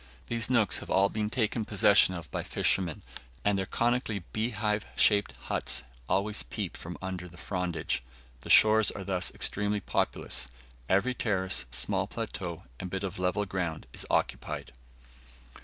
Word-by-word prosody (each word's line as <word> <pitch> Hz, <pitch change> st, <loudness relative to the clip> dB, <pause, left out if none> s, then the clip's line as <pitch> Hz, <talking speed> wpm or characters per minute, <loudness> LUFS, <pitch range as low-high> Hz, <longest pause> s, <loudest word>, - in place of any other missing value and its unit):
These 115 Hz, -1 st, 0 dB
nooks 115 Hz, -5 st, +3 dB
have -, -, -10 dB
all 100 Hz, +1 st, +4 dB
been 105 Hz, -1 st, -2 dB
taken 110 Hz, -1 st, 0 dB
possession 95 Hz, -2 st, +5 dB
of 85 Hz, -3 st, -8 dB
by -, -, -2 dB
fishermen, 90 Hz, -5 st, 0 dB, 0.4 s
and 105 Hz, 0 st, +3 dB
their 95 Hz, -1 st, -1 dB
conically 120 Hz, -5 st, 0 dB
beehive 105 Hz, -2 st, 0 dB
shaped 100 Hz, -2 st, +4 dB
huts -, -, 0 dB, 0.3 s
always 100 Hz, +3 st, +1 dB
peep -, -, -4 dB
from 90 Hz, +2 st, -7 dB
under 90 Hz, -1 st, -4 dB
the 90 Hz, -, -15 dB
frondage. 85 Hz, -8 st, -2 dB, 0.4 s
The 65 Hz, -, -10 dB
shores 110 Hz, 0 st, +7 dB
are 100 Hz, -, -5 dB
thus 95 Hz, -2 st, 0 dB
extremely 105 Hz, +1 st, +2 dB
populous; 80 Hz, -, -1 dB, 0.4 s
every 100 Hz, +7 st, +3 dB
terrace, 95 Hz, -, 0 dB
small -, -, +1 dB
plateau, -, -, -5 dB, 0.2 s
and 90 Hz, -, -5 dB
bit 95 Hz, +2 st, -3 dB
of 95 Hz, -1 st, -4 dB
level 90 Hz, +3 st, +1 dB
ground 90 Hz, -5 st, -3 dB
is -, -, 0 dB
occupied. -, -, -1 dB
100 Hz, 150 wpm, -29 LUFS, 90-105 Hz, 0.4 s, shores